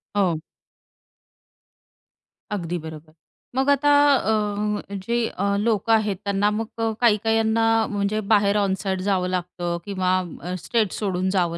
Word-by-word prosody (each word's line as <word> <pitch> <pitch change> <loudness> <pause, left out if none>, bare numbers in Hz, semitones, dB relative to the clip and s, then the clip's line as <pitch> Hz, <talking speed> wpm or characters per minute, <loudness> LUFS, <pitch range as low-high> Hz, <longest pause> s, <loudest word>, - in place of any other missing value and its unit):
हो. 180 -6 +2 2.1
अगदी 175 -4 -2
बरोबर. 155 0 -10 0.4
मग 265 +2 +1
आता 285 +1 +4 0.2
अ, 220 - 0 0.3
म 210 0 -1 0.2
जे 235 +1 0
अ, 200 +1 -1
लोकं 225 0 +2
आहेत 210 -2 0
त्यांना 200 +1 +1
मग 225 0 -3
काही 230 -3 +5
काहींना 225 0 +2 0.3
म्हणजे 205 +1 0
बाहेर 205 0 +3
ऑन 195 -1 +1
साईट 190 -2 -1
जावं 185 -2 +1
लागतं 175 -1 -3
किंवा 185 -2 0 0.2
अ, 180 +2 -5
स्टेट 225 -5 +1
सोडून 190 -3 -1
जावं 170 -2 0
200 Hz, 135 wpm, -23 LUFS, 185-220 Hz, 2.1 s, काही